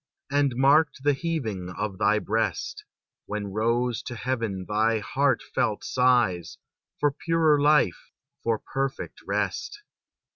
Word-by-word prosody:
And 140 -3 +2
marked 140 +2 +3
the 145 0 +4
heaving 130 - -3
of 105 -2 -3
thy 105 +1 +3
breast, 105 -3 -2 0.4
When 105 -1 -4
rose 115 +2 0
to 120 - -5
heaven 115 -7 -2
thy 110 +2 +2
heartfelt 130 -2 0
sighs 120 -10 +2 0.4
For 145 -1 +3
purer 160 0 +2
life, 150 0 +3 0.3
for 115 -1 +1
perfect 135 +4 -4
rest. 415 +4 -2
120 Hz, 115 wpm, -26 LUFS, 105-145 Hz, 0.4 s, the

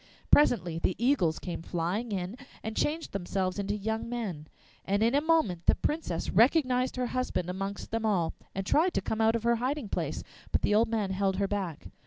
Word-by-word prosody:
Presently 180 - +4
the 180 - 0
eagles 225 - +2
came 175 -3 -5
flying 180 +8 -2
in, 190 +1 -3 0.3
and 220 0 -4
changed 320 +2 -1
themselves 190 0 -2
into 200 +1 -1
young 220 +2 -3
men, 195 -11 -4 0.4
and 200 +2 +1
in 230 +2 +3
a 285 - +4
moment 310 - +1
the - - +6
Princess 295 - -2
recognised 255 - +3
her 250 -1 -1
husband 185 -8 -1
amongst 195 +2 -5
them 225 0 -1
all, 190 -7 +1 0.2
and 195 0 -2
tried 335 - +3
to - - +2
come 220 +4 -2
out 225 +1 +4
of 230 - -2
her 235 0 +3
hiding 255 -1 -2
place; - - -2 0.3
but - - +1
the - - +2
old 220 +2 +4
man 215 -4 0
held 190 0 +1
her 200 +1 0
back. 190 -6 -3
210 Hz, 200 wpm, -29 LUFS, 185-245 Hz, 0.4 s, the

